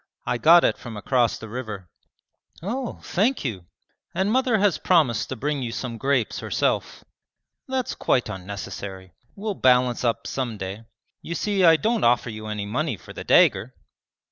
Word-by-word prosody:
'I 125 Hz, -, -1 dB
got 170 Hz, +4 st, +7 dB
it -, -, +1 dB
from 115 Hz, -3 st, -8 dB
across 120 Hz, +2 st, +1 dB
the 115 Hz, -, -9 dB
river.' 110 Hz, -5 st, -6 dB, 0.8 s
'Oh, 240 Hz, +6 st, -4 dB
thank 220 Hz, -, 0 dB
you!' 95 Hz, -8 st, -4 dB, 0.5 s
'And 190 Hz, +3 st, +1 dB
mother 255 Hz, -2 st, +2 dB
has 205 Hz, -3 st, +2 dB
promised 155 Hz, -11 st, +2 dB
to -, -, -3 dB
bring 145 Hz, +3 st, -2 dB
you 120 Hz, -2 st, -3 dB
some 115 Hz, -1 st, -5 dB
grapes 135 Hz, -5 st, 0 dB
herself.' -, -, -1 dB, 0.6 s
'That's 260 Hz, -1 st, -2 dB
quite 125 Hz, -, +1 dB
unnecessary. 95 Hz, -1 st, -7 dB, 0.2 s
We'll 210 Hz, +1 st, -3 dB
balance 125 Hz, -5 st, +3 dB
up 115 Hz, -2 st, 0 dB
some 125 Hz, -5 st, -3 dB
day. 100 Hz, +3 st, -6 dB, 0.4 s
You 170 Hz, -, -5 dB
see 200 Hz, +1 st, 0 dB
I 165 Hz, -2 st, +8 dB
don't 225 Hz, +7 st, 0 dB
offer 120 Hz, 0 st, +3 dB
you 110 Hz, 0 st, -7 dB
any 105 Hz, -1 st, -3 dB
money 125 Hz, +3 st, -2 dB
for -, -, -13 dB
the -, -, -7 dB
dagger!' -, -, +4 dB
125 Hz, 165 wpm, -24 LUFS, 110-180 Hz, 0.8 s, I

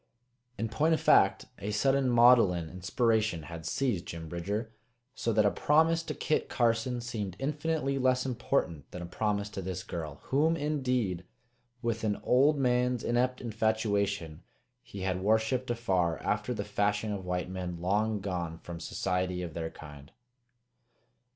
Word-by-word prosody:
In 115 Hz, +2 st, -1 dB
point 155 Hz, +9 st, +2 dB
of -, -, -3 dB
fact, -, -, +4 dB
a 100 Hz, -, -4 dB
sudden 135 Hz, +5 st, +2 dB
maudlin 115 Hz, -9 st, +5 dB
inspiration 105 Hz, -1 st, 0 dB
had 80 Hz, 0 st, -7 dB
seized 120 Hz, -11 st, -1 dB
Jim 80 Hz, -1 st, -6 dB
Bridger, 100 Hz, +7 st, -3 dB, 0.4 s
so 115 Hz, -, -1 dB
that 110 Hz, -1 st, +3 dB
a 100 Hz, -, +4 dB
promise 160 Hz, +2 st, +3 dB
to -, -, -5 dB
Kit 155 Hz, -, 0 dB
Carson 120 Hz, +1 st, +1 dB
seemed 105 Hz, -6 st, -4 dB
infinitely 145 Hz, 0 st, -1 dB
less 130 Hz, 0 st, +2 dB
important 120 Hz, -, -1 dB
than 90 Hz, -, -7 dB
a -, -, -5 dB
promise 100 Hz, +3 st, -1 dB
to 95 Hz, -, -5 dB
this 95 Hz, 0 st, -4 dB
girl, 80 Hz, -7 st, -6 dB
whom, 155 Hz, +5 st, +2 dB
indeed, 125 Hz, -, -1 dB, 0.6 s
with 115 Hz, -1 st, -1 dB
an 105 Hz, -2 st, 0 dB
old 140 Hz, +4 st, +4 dB
man's 125 Hz, -2 st, +1 dB
inept 125 Hz, +2 st, +1 dB
infatuation, 100 Hz, -7 st, -1 dB, 0.4 s
he 100 Hz, -, -9 dB
had 95 Hz, -1 st, -1 dB
worshiped 110 Hz, +5 st, +1 dB
afar 95 Hz, -8 st, +1 dB
after 105 Hz, +3 st, -1 dB
the 105 Hz, -4 st, -3 dB
fashion 105 Hz, +1 st, 0 dB
of 100 Hz, -2 st, -5 dB
white 90 Hz, 0 st, -2 dB
men 90 Hz, -2 st, -4 dB
long 105 Hz, +4 st, 0 dB
gone 85 Hz, -4 st, -3 dB
from 85 Hz, 0 st, -8 dB
society 90 Hz, +1 st, -2 dB
of 85 Hz, -3 st, -6 dB
their 80 Hz, 0 st, -3 dB
kind. 75 Hz, -3 st, -12 dB
105 Hz, 150 wpm, -30 LUFS, 90-125 Hz, 0.6 s, maudlin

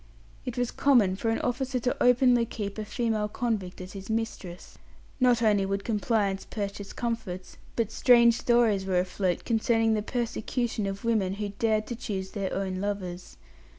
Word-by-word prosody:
It 250 Hz, -1 st, -5 dB
was 245 Hz, -1 st, 0 dB
common 235 Hz, -10 st, +3 dB
for 225 Hz, +4 st, -2 dB
an 225 Hz, -, +1 dB
officer 255 Hz, +1 st, -1 dB
to 250 Hz, -, 0 dB
openly 250 Hz, -1 st, +5 dB
keep 210 Hz, -2 st, -5 dB
a 215 Hz, -, -3 dB
female 215 Hz, 0 st, -1 dB
convict 210 Hz, -5 st, -3 dB
as 185 Hz, 0 st, -8 dB
his 195 Hz, 0 st, -9 dB
mistress. 220 Hz, -5 st, -4 dB, 0.4 s
Not 245 Hz, -2 st, +4 dB
only 205 Hz, -3 st, +4 dB
would 195 Hz, +1 st, -2 dB
compliance 210 Hz, -3 st, 0 dB
purchase 200 Hz, -1 st, -5 dB
comforts, 225 Hz, -6 st, -4 dB, 0.2 s
but 225 Hz, -2 st, 0 dB
strange 235 Hz, -2 st, +6 dB
stories 225 Hz, -5 st, +2 dB
were 185 Hz, -1 st, +1 dB
afloat 180 Hz, 0 st, -1 dB
concerning 225 Hz, -1 st, +2 dB
the 215 Hz, -, +1 dB
persecution 235 Hz, -1 st, -2 dB
of 195 Hz, +2 st, -5 dB
women 210 Hz, -5 st, +1 dB
who 205 Hz, 0 st, -3 dB
dared 215 Hz, +1 st, 0 dB
to 240 Hz, -, -5 dB
choose 195 Hz, -5 st, -4 dB
their 195 Hz, -3 st, -3 dB
own 190 Hz, -1 st, -2 dB
lovers. 185 Hz, -3 st, -4 dB
215 Hz, 165 wpm, -28 LUFS, 195-235 Hz, 0.4 s, strange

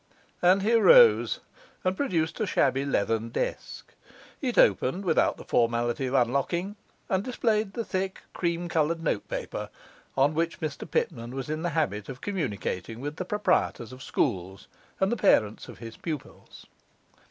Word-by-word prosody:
And 185 Hz, +2 st, +4 dB
he 225 Hz, +3 st, +2 dB
arose 475 Hz, -, +6 dB, 0.4 s
and 185 Hz, 0 st, +1 dB
produced 170 Hz, -, -1 dB
a 215 Hz, -, 0 dB
shabby 135 Hz, -4 st, +2 dB
leathern 115 Hz, -3 st, 0 dB
desk. -, -, -4 dB, 0.5 s
It 255 Hz, -4 st, -2 dB
opened 180 Hz, +10 st, +3 dB
without 165 Hz, -3 st, +2 dB
the -, -, -10 dB
formality 120 Hz, +2 st, +1 dB
of 130 Hz, -, -2 dB
unlocking, 140 Hz, -, 0 dB, 0.3 s
and 190 Hz, 0 st, 0 dB
displayed 220 Hz, -4 st, 0 dB
the 230 Hz, -, -3 dB
thick 190 Hz, -1 st, -3 dB
cream 170 Hz, 0 st, -1 dB
coloured 165 Hz, 0 st, 0 dB
notepaper 110 Hz, -, -3 dB, 0.5 s
on 140 Hz, +3 st, +4 dB
which 165 Hz, +1 st, -1 dB
Mr 155 Hz, -2 st, -5 dB
Pitman 120 Hz, +2 st, -2 dB
was 135 Hz, +2 st, -4 dB
in 155 Hz, +1 st, -2 dB
the 175 Hz, -, -1 dB
habit 105 Hz, -10 st, -1 dB
of 135 Hz, -1 st, -7 dB
communicating 115 Hz, -, -3 dB
with 145 Hz, +3 st, -5 dB
the 185 Hz, -, -3 dB
proprietors 185 Hz, -, 0 dB
of 130 Hz, -, -11 dB
schools 95 Hz, -4 st, -2 dB, 0.3 s
and 190 Hz, +1 st, +2 dB
the 240 Hz, -, 0 dB
parents 110 Hz, -, +2 dB
of -, -, -10 dB
his 115 Hz, -1 st, -9 dB
pupils. 155 Hz, -5 st, -7 dB
155 Hz, 155 wpm, -27 LUFS, 120-190 Hz, 0.5 s, arose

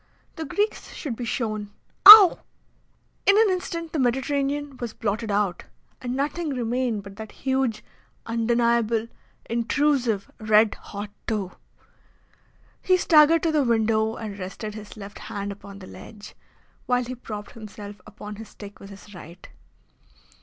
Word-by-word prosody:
The 320 Hz, -, -5 dB
Greeks 415 Hz, +8 st, -2 dB
should 275 Hz, -7 st, -5 dB
be 240 Hz, -, -5 dB
shown 215 Hz, -3 st, -3 dB, 0.4 s
Ow! 415 Hz, -3 st, +12 dB, 0.9 s
In 400 Hz, -, +6 dB
an 440 Hz, -3 st, +4 dB
instant 335 Hz, -3 st, -4 dB
the 315 Hz, -, -1 dB
Mediterranean 275 Hz, +2 st, -1 dB
was 235 Hz, -3 st, -6 dB
blotted 220 Hz, +1 st, -3 dB
out, 200 Hz, -3 st, -1 dB, 0.4 s
and 250 Hz, -1 st, -4 dB
nothing 300 Hz, +4 st, -2 dB
remained 240 Hz, -3 st, -2 dB
but 200 Hz, 0 st, -12 dB
that 220 Hz, -1 st, -8 dB
huge, 265 Hz, -4 st, 0 dB, 0.4 s
undeniable, 230 Hz, -1 st, +1 dB, 0.4 s
intrusive, 240 Hz, -2 st, 0 dB
red 215 Hz, 0 st, +3 dB
hot 205 Hz, 0 st, -8 dB, 0.2 s
toe. 205 Hz, -5 st, -2 dB, 1.3 s
He 370 Hz, -1 st, +3 dB
staggered 320 Hz, -1 st, +5 dB
to 330 Hz, -, +2 dB
the 305 Hz, -1 st, +2 dB
window 220 Hz, -2 st, +1 dB
and 205 Hz, -3 st, -7 dB
rested 195 Hz, +3 st, -6 dB
his 215 Hz, 0 st, -10 dB
left 200 Hz, -1 st, -10 dB
hand 200 Hz, 0 st, -5 dB
upon 200 Hz, 0 st, -11 dB
the 195 Hz, -, -11 dB
ledge, 205 Hz, +2 st, -12 dB, 0.5 s
while 250 Hz, 0 st, +1 dB
he 250 Hz, +1 st, -6 dB
propped 210 Hz, -4 st, -8 dB
himself 205 Hz, -2 st, -10 dB
upon 210 Hz, 0 st, -9 dB
his 220 Hz, -1 st, -10 dB
stick 205 Hz, -1 st, -12 dB
with 195 Hz, -, -12 dB
his 200 Hz, +1 st, -13 dB
right. 175 Hz, 0 st, -12 dB
225 Hz, 140 wpm, -24 LUFS, 210-270 Hz, 1.3 s, Ow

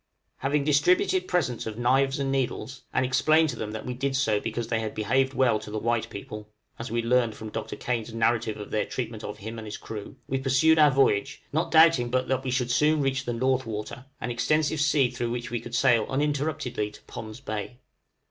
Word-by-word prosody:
Having 140 Hz, +2 st, 0 dB
distributed 365 Hz, -, +3 dB
presents 130 Hz, -11 st, -1 dB
of 110 Hz, -1 st, -5 dB
knives 135 Hz, +3 st, +2 dB
and 135 Hz, -1 st, -1 dB
needles, 130 Hz, -2 st, -2 dB
and 130 Hz, -, +1 dB
explained 155 Hz, +5 st, +3 dB
to -, -, -3 dB
them 110 Hz, -, -4 dB
that 110 Hz, 0 st, -6 dB
we 125 Hz, -, -3 dB
did 135 Hz, +2 st, -2 dB
so 110 Hz, -6 st, +2 dB
because 115 Hz, +2 st, -3 dB
they 115 Hz, -, +1 dB
had 110 Hz, -1 st, -4 dB
behaved 130 Hz, +5 st, +1 dB
well 120 Hz, -4 st, +3 dB
to 105 Hz, -, -10 dB
the 110 Hz, -, -4 dB
white 115 Hz, +1 st, 0 dB
people, 105 Hz, +1 st, -8 dB, 0.3 s
(as 115 Hz, -, -5 dB
we 115 Hz, +1 st, -1 dB
learned 120 Hz, -2 st, +2 dB
from 110 Hz, 0 st, -8 dB
Dr. 110 Hz, 0 st, -5 dB
Kane's 120 Hz, -2 st, -3 dB
narrative 115 Hz, -1 st, 0 dB
of 105 Hz, -, -8 dB
their 105 Hz, -, 0 dB
treatment 115 Hz, -3 st, -5 dB
of 105 Hz, 0 st, -6 dB
him 110 Hz, +2 st, -7 dB
and 110 Hz, -, -8 dB
his 105 Hz, -, -5 dB
crew), 110 Hz, +2 st, -8 dB
we 135 Hz, -, -1 dB
pursued 135 Hz, +5 st, +4 dB
our 150 Hz, -1 st, +7 dB
voyage, 130 Hz, -7 st, +1 dB
not 165 Hz, +2 st, 0 dB
doubting 160 Hz, -7 st, +5 dB
but 130 Hz, +1 st, 0 dB
that 130 Hz, 0 st, 0 dB
we 130 Hz, -, -3 dB
should 125 Hz, -1 st, 0 dB
soon 150 Hz, +4 st, +3 dB
reach 135 Hz, 0 st, -1 dB
the 120 Hz, -, -2 dB
North 130 Hz, +1 st, 0 dB
Water, 110 Hz, +4 st, -6 dB
an 125 Hz, -, -3 dB
extensive 155 Hz, +5 st, +1 dB
sea 145 Hz, -5 st, +3 dB
through 120 Hz, -1 st, -3 dB
which 120 Hz, 0 st, -4 dB
we 120 Hz, -, -1 dB
could 120 Hz, 0 st, -6 dB
sail 125 Hz, -4 st, +3 dB
uninterruptedly 145 Hz, -5 st, -1 dB
to 105 Hz, -, -15 dB
Pond's 110 Hz, +1 st, -8 dB
Bay. 110 Hz, -2 st, -5 dB
125 Hz, 215 wpm, -26 LUFS, 110-135 Hz, 0.3 s, our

